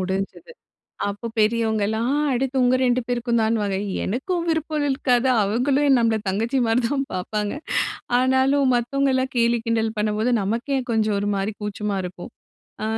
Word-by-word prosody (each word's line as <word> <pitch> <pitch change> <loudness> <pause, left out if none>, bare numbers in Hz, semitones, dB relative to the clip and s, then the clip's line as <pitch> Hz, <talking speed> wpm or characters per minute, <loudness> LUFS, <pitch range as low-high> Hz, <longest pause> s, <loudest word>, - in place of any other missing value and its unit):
முடிஞ்சிது. 195 - -4 0.6
அப்ப 205 +3 -4
பெரியவங்கலாம் 220 +2 +1 0.2
அடுத்து 260 +2 -1
உங்க 250 +1 +4
2 250 0 +2
பேருக்கும்தான்னுவாங்க. 230 -4 0 0.3
எனக்கும் 335 - -2
விருப்பம் 315 -2 -1
இருக்காது, 265 -2 +1
அவங்களும் 265 +6 +2
நம்மள 230 -2 +2
தங்கச்சி 225 +7 0
மாரி 225 +3 +2
தான் 275 0 -1
பாப்பாங்க. 205 +3 -2 0.7
ஆனாலும் 265 +2 +3
மத்தவங்க 275 +4 0
எல்லாம் 260 0 0
கேலி 235 0 +3
கிண்டல் 225 -1 0
பண்ணும்போது, 215 +3 0
நமக்கே 230 +8 -1
கொஞ்சம் 215 -2 +1
ஒரு 205 +1 -1
மாரி 195 +2 -2
கூச்சமா 210 0 -3
இருக்கும். 180 +1 -7 0.5
அ - - -1
235 Hz, 135 wpm, -23 LUFS, 210-260 Hz, 0.7 s, உங்க